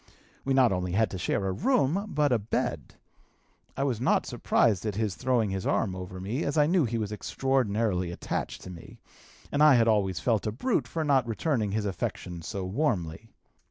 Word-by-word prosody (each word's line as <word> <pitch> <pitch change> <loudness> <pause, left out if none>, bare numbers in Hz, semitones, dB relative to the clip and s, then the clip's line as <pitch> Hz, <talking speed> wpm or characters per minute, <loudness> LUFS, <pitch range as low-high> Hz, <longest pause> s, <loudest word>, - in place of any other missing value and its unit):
We 135 0 0
not 130 -4 +5
only 90 -1 -2
had 110 +3 +2
to 95 - -5
share 95 - -1
a - - 0
room, 195 - +1
but 150 -2 +2
a 120 - +3
bed. 105 +2 -3 0.8
I 135 - 0
was 125 -5 -1
not 130 - +2
surprised 105 -6 +1
at 105 -3 -2
his 105 -2 -1
throwing 120 -4 0
his 95 -1 -3
arm 95 -4 0
over 95 0 -7
me, 110 - -3
as 145 +2 -2
I 150 - +5
knew 170 -1 +3
he 115 0 -2
was 105 -2 -3
extraordinarily 105 -6 0
attached 85 - -4
to 90 - -8
me, 85 -2 -12 0.5
and 145 - 0
I 150 -3 +8
had 115 -1 +4
always 100 -6 +2
felt 110 +4 0
a - - 0
brute 135 - -1
for 160 +5 -2
not 135 -5 +2
returning 115 -2 -1
his 110 -1 -1
affection 90 -2 -4
so 95 +3 -5
warmly. 100 - -2
110 Hz, 195 wpm, -28 LUFS, 95-135 Hz, 0.8 s, I